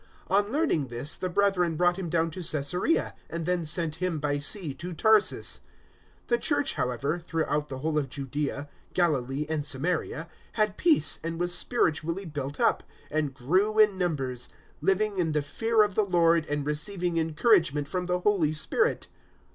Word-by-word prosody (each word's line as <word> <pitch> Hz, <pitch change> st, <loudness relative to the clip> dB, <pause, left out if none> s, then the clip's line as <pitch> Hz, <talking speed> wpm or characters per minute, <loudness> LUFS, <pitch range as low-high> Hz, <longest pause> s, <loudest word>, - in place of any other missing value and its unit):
On 205 Hz, +2 st, +2 dB
learning 280 Hz, -, +1 dB
this, 125 Hz, +5 st, -2 dB
the 185 Hz, -, -3 dB
brethren 180 Hz, -3 st, +1 dB
brought 175 Hz, +3 st, +2 dB
him 175 Hz, -3 st, -4 dB
down 165 Hz, 0 st, +1 dB
to 185 Hz, -, -6 dB
Caesarea, 160 Hz, -, 0 dB, 0.2 s
and 165 Hz, -1 st, -4 dB
then 180 Hz, -1 st, 0 dB
sent 155 Hz, 0 st, +1 dB
him 180 Hz, -2 st, -1 dB
by 145 Hz, -1 st, -1 dB
sea 155 Hz, 0 st, 0 dB
to 175 Hz, +5 st, -7 dB
Tarsus. 220 Hz, +4 st, +3 dB, 0.6 s
009:031 -, -, -37 dB
The 240 Hz, -, +3 dB
Church, 285 Hz, +2 st, +1 dB
however, 125 Hz, +7 st, -1 dB
throughout 150 Hz, -3 st, -2 dB
the 130 Hz, -, -5 dB
whole 155 Hz, +3 st, 0 dB
of 140 Hz, -2 st, -4 dB
Judaea, 140 Hz, +2 st, -4 dB, 0.3 s
Galilee 145 Hz, -4 st, 0 dB
and 155 Hz, -2 st, -2 dB
Samaria, 160 Hz, +3 st, -1 dB, 0.3 s
had 215 Hz, -2 st, +1 dB
peace 330 Hz, +3 st, +3 dB
and 165 Hz, 0 st, -4 dB
was 175 Hz, 0 st, 0 dB
spiritually 170 Hz, -3 st, 0 dB
built 145 Hz, -3 st, -5 dB
up; -, -, +3 dB, 0.3 s
and 150 Hz, -3 st, -1 dB
grew 185 Hz, -, +1 dB
in 210 Hz, -3 st, +4 dB
numbers, 135 Hz, -8 st, -2 dB, 0.3 s
living 200 Hz, +1 st, +1 dB
in 165 Hz, -3 st, +1 dB
the 150 Hz, -1 st, 0 dB
fear 225 Hz, +9 st, +2 dB
of 205 Hz, -2 st, -1 dB
the 215 Hz, -, +2 dB
Lord 170 Hz, -4 st, +3 dB
and 145 Hz, -1 st, -2 dB
receiving 170 Hz, +3 st, -1 dB
encouragement 160 Hz, -, +2 dB
from 180 Hz, +3 st, -3 dB
the 180 Hz, 0 st, 0 dB
Holy 180 Hz, -7 st, +2 dB
Spirit. 445 Hz, -, +1 dB
165 Hz, 170 wpm, -27 LUFS, 150-190 Hz, 0.6 s, in